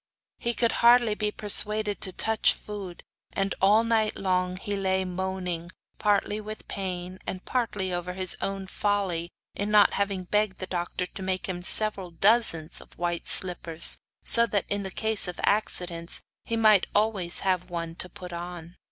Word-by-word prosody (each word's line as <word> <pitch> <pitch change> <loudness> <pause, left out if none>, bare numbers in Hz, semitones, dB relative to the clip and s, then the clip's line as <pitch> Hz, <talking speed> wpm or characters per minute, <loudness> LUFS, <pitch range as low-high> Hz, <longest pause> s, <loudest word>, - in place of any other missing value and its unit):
He 235 0 -1
could 235 -1 +1
hardly 235 -2 +5
be 210 0 -2
persuaded 210 0 +2
to 190 - +1
touch 220 +4 +2
food, 200 -4 -9 0.3
and 195 0 -1
all 210 +4 +4
night 220 -2 0
long 185 -1 -1
he 205 +1 -4
lay 190 -1 -1
moaning, 180 -2 -4 0.3
partly 210 0 0
with 215 +1 -9
pain, 185 -1 -5
and 185 - -6
partly 205 -7 -2
over 175 +1 -4
his 185 -1 -1
own 195 0 -4
folly 190 -4 -2 0.2
in 205 +1 -3
not 210 -1 +5
having 200 -2 -2
begged 210 +1 -1
the 185 - -5
doctor 180 0 -4
to 195 - -10
make 185 0 -3
him 180 -2 -5
several 195 0 +3
dozens 175 -3 +2
of - - -19
white 175 -1 -3
slippers, 170 -3 +3 0.3
so 235 0 +5
that 205 -4 -1
in 200 -1 -3
case 220 +1 +4
of 180 - -7
accidents 175 -5 +2 0.2
he 230 - -2
might 215 -4 +4
always 205 -5 +1
have 185 -2 -1
one 170 -1 -5
to 180 - -2
put 180 0 -10
on. 175 0 -8
190 Hz, 165 wpm, -26 LUFS, 180-210 Hz, 0.3 s, hardly